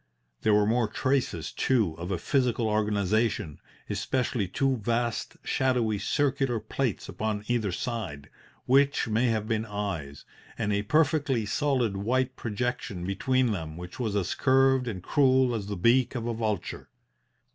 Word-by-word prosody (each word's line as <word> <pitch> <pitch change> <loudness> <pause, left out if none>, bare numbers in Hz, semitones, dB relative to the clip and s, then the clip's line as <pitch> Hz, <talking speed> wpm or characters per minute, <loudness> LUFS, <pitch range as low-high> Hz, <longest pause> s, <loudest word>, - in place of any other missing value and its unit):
There 105 - +4
were 105 0 +4
more 115 +1 +2
traces, 125 - -1
too, 110 -11 +1
of 85 +2 -5
a 95 - 0
physical 120 +3 +1
organization, 105 -5 0 0.3
especially 105 +1 -1
two 135 +7 0
vast 115 +1 -2
shadowy, 120 -5 +1
circular 135 +1 0
plates 125 -1 -2
upon 105 -1 -3
either 115 -5 0
side, 90 - -4 0.4
which 140 0 +3
may 115 +3 +2
have 110 -2 0
been 110 -1 0
eyes, 100 -10 -5 0.3
and 105 - 0
a 100 - +1
perfectly 145 -1 +2
solid 120 -2 0
white 130 +5 0
projection 110 -5 -3
between 125 +6 +1
them 80 -5 -4
which 90 +4 -9
was 110 -5 -1
as 100 -1 0
curved 135 -1 +3
and 95 -6 -4
cruel 130 -1 +3
as 105 -4 -3
the 100 -2 -4
beak 120 +8 +3
of 115 -2 -3
a 120 - -1
vulture. 110 -5 -3
115 Hz, 145 wpm, -28 LUFS, 100-130 Hz, 0.4 s, There